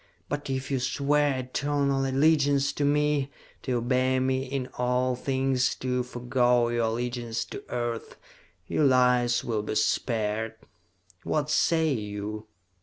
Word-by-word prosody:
But 145 -1 -3
if 130 +1 -3
you 135 - +1
swear 140 +2 +1
eternal 140 +1 0
allegiance 140 0 +3
to 145 - -2
me, 145 -1 +2 0.3
to 130 - -2
obey 130 +2 +1
me 130 0 0
in 130 -1 -3
all 125 +1 +1
things, 130 0 0
to 125 0 -1
forego 125 -1 +1
your 120 -1 0
allegiance 120 0 -2
to - - -8
Earth, 120 -2 -3 0.5
your 150 - +1
lives 125 -2 +3
will 110 -3 -1
be 105 - -4
spared! 110 0 0 0.7
What 150 -1 -1
say 160 -1 +2
you?" 105 -1 -5
130 Hz, 130 wpm, -27 LUFS, 120-140 Hz, 0.7 s, allegiance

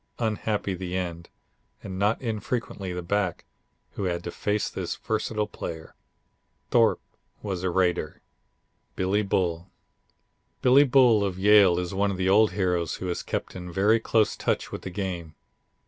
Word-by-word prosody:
Unhappy 105 -3 -1
the 90 0 -4
end, 85 -2 -5 0.5
and 95 -1 -6
not 105 +3 +2
infrequently 110 -4 -3
the 90 0 -4
back, 95 -1 -1 0.5
who 100 - -4
had 85 -1 -2
to 85 - -5
face 105 +3 -1
this - - -4
versatile 110 0 -2
player. 80 -5 -7 0.8
Thorpe - - +3 0.4
was 95 -4 -3
a 95 - 0
raider. 90 -4 0 0.8
Billy 95 +3 +1
Bull 90 -3 -1 0.9
Billy 135 +3 +6
Bull 125 -5 +5
of 95 -2 -2
Yale 100 -2 +6
is 90 +1 -3
one 100 +1 +1
of 95 - -3
the 95 0 +1
old 105 +2 +5
heroes 90 -4 0
who - - -6
has 85 - -2
kept - - -4
in 90 -1 -7
very 105 +6 +3
close 110 -1 +2
touch - - -2
with - - -6
the - - -6
game. 90 -5 -5
95 Hz, 155 wpm, -26 LUFS, 90-105 Hz, 0.9 s, Billy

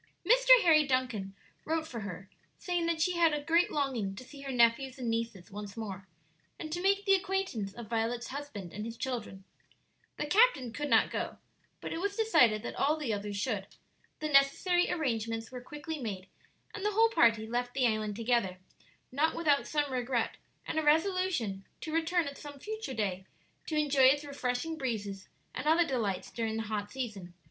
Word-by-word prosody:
Mr. - - +4
Harry 315 -3 +6
Duncan 255 -8 -1 0.3
wrote 320 0 -1
for 240 -6 -6
her, 195 -2 -7 0.3
saying 350 -2 -1
that 335 -1 0
she 350 +2 +1
had 335 -2 +4
a 295 - -4
great 335 +3 +3
longing 250 -9 -1
to 230 - -9
see 280 +2 -12
her 275 -1 -5
nephews 250 +2 +3
and 240 -3 -2
nieces 225 -6 -3
once 205 +1 -8
more, 195 -3 -6 0.5
and 310 - -7
to 350 +2 -2
make 395 +1 +2
the 390 - +5
acquaintance 380 - -1
of 235 - -7
Violet's 230 +1 -1
husband 265 - -7
and 210 - -5
his 230 +1 -6
children. 230 -6 -4 0.7
The - - -2
captain 360 - +3
could 295 +3 -3
not - - +4
go, - - -3 0.4
but - - -5
it 330 - -3
was 400 +1 -1
decided 275 - +4
that - - -4
all 300 +3 +1
the 275 -8 -2
others 205 0 -4
should. 205 -3 -2 0.5
The 305 - -1
necessary 295 +6 +4
arrangements 230 -7 -2
were 250 -1 -7
quickly 295 +4 -6
made, 200 -7 -5 0.5
and 410 - -6
the 420 0 +1
whole 450 +2 +5
party 230 - +4
left 245 +2 -3
the 265 -2 +2
island 215 -2 0
together, 230 -5 0 0.5
not 300 +5 +1
without 295 -4 +2
some 295 -2 0
regret 245 -2 -1 0.3
and 315 - -1
a - - -1
resolution 320 - +1 0.2
to 315 - -5
return 330 0 +1
at 280 - -7
some 290 -1 -9
future 430 -3 -5
day 190 -3 -2 0.4
to 315 - -2
enjoy 285 -3 +4
its 285 +3 +5
refreshing 280 +3 -3
breezes 205 -7 -4 0.2
and 260 +4 -4
other 330 +2 +5
delights 220 - -2
during 225 -1 -2
the 225 - -2
hot 205 -1 -3
season. 205 -9 -6
260 Hz, 185 wpm, -31 LUFS, 220-320 Hz, 0.7 s, Harry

